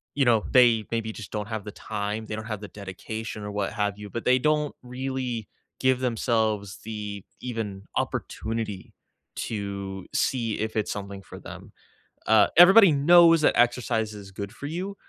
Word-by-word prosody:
you 140 -1 +3
know, 115 -3 +4
they 120 -4 +5
maybe 115 -1 -1
just 110 -1 -9
don't 105 -1 -3
have 110 -2 -4
the 105 - -6
time, 105 +1 -4
they 105 - -5
don't 110 0 -6
have 105 -3 -5
the 105 - -7
dedication 105 +2 -7
or 105 - -5
what 100 -1 -2
have 105 -1 -1
you, 105 -1 -9
but 115 - -5
they 130 0 +4
don't 150 +1 +1
really 125 -3 -4 0.3
give 130 -1 +2
themselves 110 -4 0
the 105 -2 -6 0.2
even 110 -6 -4
opportunity 110 -3 -3 0.4
to 100 -3 -4
see 115 -4 0
if 110 0 -3
it's 110 -2 0
something 100 -1 -6
for - - -11
them. - - -11 0.6
Uh, 110 -2 +6
everybody 190 +1 +9
knows 165 +3 +6
that - - +4
exercise 120 -3 +1
is 100 -2 -10
good 100 +1 -6
for 140 +3 -7
you, 185 +5 -4
110 Hz, 170 wpm, -26 LUFS, 105-125 Hz, 0.6 s, everybody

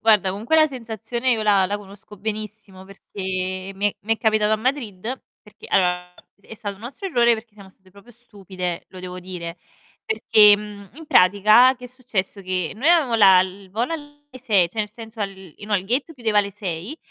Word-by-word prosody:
Guarda, 210 -4 +4
comunque 220 +11 0
la 310 0 +6
sensazione 235 -1 -4
io 225 -2 +1
la 200 -3 +3
la 205 +2 -2
conosco 205 +1 -14
benissimo 210 -2 -7
perché 185 -1 -5
mi 200 +2 0
è - - -21
mi 225 +2 0
è - - -15
capitato 215 -1 +2
a - - +3
Madrid, 225 -6 -3 0.4
perché 210 +1 -15
allora 180 -2 +1 0.3
è 220 - -12
stato 205 -1 -5
un - - -19
nostro 270 - -7
errore, 240 -7 +4
perché 220 -1 -10
siamo 200 -2 -14
state 190 0 -25
proprio 200 +5 -18
stupide, 190 -6 -6
lo 185 - -12
devo 180 0 -7
dire, 175 -2 -7 0.5
perché, 210 - +6
mhmm, 205 -1 -10
in 320 +1 -12
pratica, 215 +7 +5
che 250 - -13
è - - -6
successo, 235 -6 -4
che 185 -3 -2
noi 270 +9 0
avevamo 315 -9 +4
la 190 -4 +7
il 190 +1 -5
volo 235 - -2
alle 290 -2 -8 0.2
6 200 -9 +3
cioè, 220 - -11
nel 210 -1 -1
senso 225 0 -11
al 200 -1 -1 0.3
no, 205 0 -1
il 185 - -4
gate 265 +9 -1
chiudeva 225 -5 +1
alle 200 -1 +1
6 195 - -6
210 Hz, 200 wpm, -22 LUFS, 190-235 Hz, 0.5 s, la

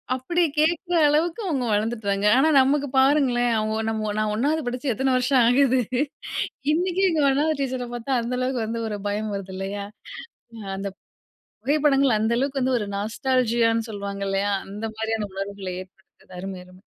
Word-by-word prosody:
அப்டி 340 +8 -1 0.2
கேக்குற 340 +3 +2
அளவுக்கு 325 +7 +1
அவுங்க 270 -8 -1
வளந்துட்டாங்க 210 -2 0
ஆனா 310 +4 +4
நமக்கு 280 +2 +3
பாருங்களேன், 265 -3 +3
அவுங்க 215 +1 -1
நம்ம, 215 -1 -2
நான் 215 0 0
1வது 295 +7 +1
படிச்சு 250 +2 -2
எத்தனை 265 +3 0
வருஷம் 255 +1 +3
ஆகுது. 260 +1 +4 0.9
இன்னைக்கும் 370 +3 +1
எங்க 315 -3 +1
1வது 300 +3 +2
டீச்சர 255 -2 -2
பாத்தா 240 +3 -5
அந்த 245 +2 -3
அளவுக்கு 255 -1 -1
வந்து 230 +1 -3
ஒரு 210 - -3
பயம் 210 +1 -2
வருது. 190 -1 -6
இல்லையா! 200 +1 -4 0.7
அ - - -10 0.2
அந்த 200 +1 -3 0.7
புகைப்படங்கள், 280 -3 +3
அந்த 220 +2 +1
அளவுக்கு 270 +1 -1
வந்து 255 0 +2
ஒரு 205 - -4
நாஸ்டாலஜியான்னு 230 +1 +1
சொல்லுவாங்கல்லையா, 200 -1 -2 0.2
அந்த 210 +3 -6
மாரியான 220 -2 -2
உணர்வுகள 195 -1 -5
ஏற்படுத்துது. 185 0 -18
அருமை, 190 0 -6
அருமை. 185 +1 -18
240 Hz, 150 wpm, -24 LUFS, 205-275 Hz, 0.9 s, ஆனா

